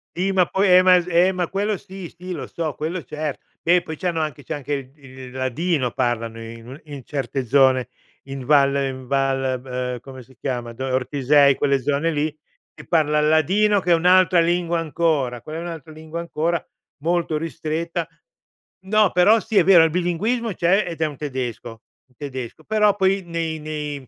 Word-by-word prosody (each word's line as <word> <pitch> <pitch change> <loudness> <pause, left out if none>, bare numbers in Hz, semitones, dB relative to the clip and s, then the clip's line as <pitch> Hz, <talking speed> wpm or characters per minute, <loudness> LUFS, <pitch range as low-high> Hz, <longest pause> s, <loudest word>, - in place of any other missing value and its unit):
Sì, 190 +2 0
ma 185 -2 +3
poi 195 +1 +1
ehm, 180 0 +7
ma 185 0 +7
ehm, 180 +1 +2
ma 180 -2 -1
quello 205 +3 -1
sì, 190 -2 -10
sì, 180 +1 -8
lo 160 - -5
so, 160 -4 -4
quello 165 +3 -4
certo, 150 +2 -5 0.2
beh 175 +1 +3
poi 160 - -7
c’hanno 175 -1 -2
anche 150 -3 -4
c’è - - -4
anche 145 0 -5
il 135 -2 -4
il 130 -2 -12
ladino, 130 +1 -1
parlano 115 -2 -2
in 115 +1 -10
un 135 +3 -10
in 145 -3 -9
certe 135 -1 -3
zone, 130 -1 +3 0.3
in 135 -1 -7
Val 140 0 +4
in 130 -1 -5
Val 130 -2 -1
come 130 -1 -11
si 130 +2 -21
chiama? 120 -2 -4
Ortisei, 135 +2 +3
quelle 140 -1 +1
zone 145 +5 0
lì, 150 0 -1 0.4
che - - -14
parlan 150 -2 +2
il 150 - +3
ladino, 195 +7 +3
che 180 -2 -1
è - - +8
un’altra 180 +1 +4
lingua 170 0 +1
ancora, 150 -6 -1
quella 155 +6 -7
è - - -5
un'altra 165 -3 -7
lingua 155 +1 -7
ancora, 170 0 -2 0.4
molto 170 -2 0
ristretta 165 +1 -3 0.8
no, 210 0 +3
però 205 +6 +5
sì, 220 -1 -2
è - - +7
vero 175 -2 +7
il 165 - +3
bilinguismo 205 +7 -1
c’è 185 +4 +2
ed 165 -1 -6
è 160 - +3
un 145 -3 -5
tedesco 125 -5 -5 0.3
un 130 - -32
tedesco, 130 0 -7
però 210 +1 +2
poi 195 -1 +1
nei 165 -2 -3
nei 150 -3 -5
155 Hz, 185 wpm, -22 LUFS, 135-175 Hz, 0.8 s, è